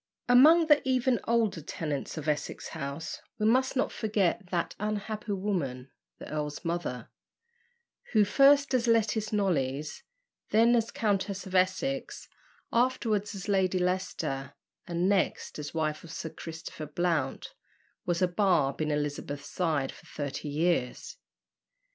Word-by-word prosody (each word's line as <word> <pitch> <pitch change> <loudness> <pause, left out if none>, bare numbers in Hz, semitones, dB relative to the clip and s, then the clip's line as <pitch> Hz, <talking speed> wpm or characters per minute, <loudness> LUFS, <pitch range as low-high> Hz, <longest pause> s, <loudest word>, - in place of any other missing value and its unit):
Among 305 +7 +7
the 295 -2 +5
even 255 -2 +2
older 225 -7 +1
tenants 150 0 -4
of 155 0 -5
Essex 150 -1 -2
House, 155 +1 -5 0.2
we 215 - 0
must 260 +5 +3
not 260 - +1
forget 205 -2 0
that 175 -2 -1
unhappy 210 +1 -3
woman, 145 -11 -2 0.3
the - - -10
earl's 150 +2 -4
mother, 165 -8 -3 1.0
who, 215 -2 +5
first 280 +5 +5
as 245 -2 +2
Lettice 220 -1 +2
Knollys, 150 -8 -1 0.5
then 230 +2 +5
as 230 -1 +1
Countess 200 -3 -1
of 190 - -9
Essex, 190 +9 0 0.5
afterwards 225 -4 +1
as 195 +1 -7
Lady 190 -2 +2
Leicester, 180 -7 -2 0.3
and 175 +1 0
next 195 -5 0
as 145 -1 -5
wife 155 -2 -2
of 170 - -11
Sir 165 - -5
Christopher 160 -1 -8
Blount, 155 -3 -1 0.5
was 175 +1 0
a - - +5
barb 175 -7 +2
in 155 - 0
Elizabeth's 145 -1 -3
side 155 -7 0
for - - -16
thirty 145 0 -5
years. 150 -4 -1
185 Hz, 135 wpm, -29 LUFS, 150-220 Hz, 1.0 s, Among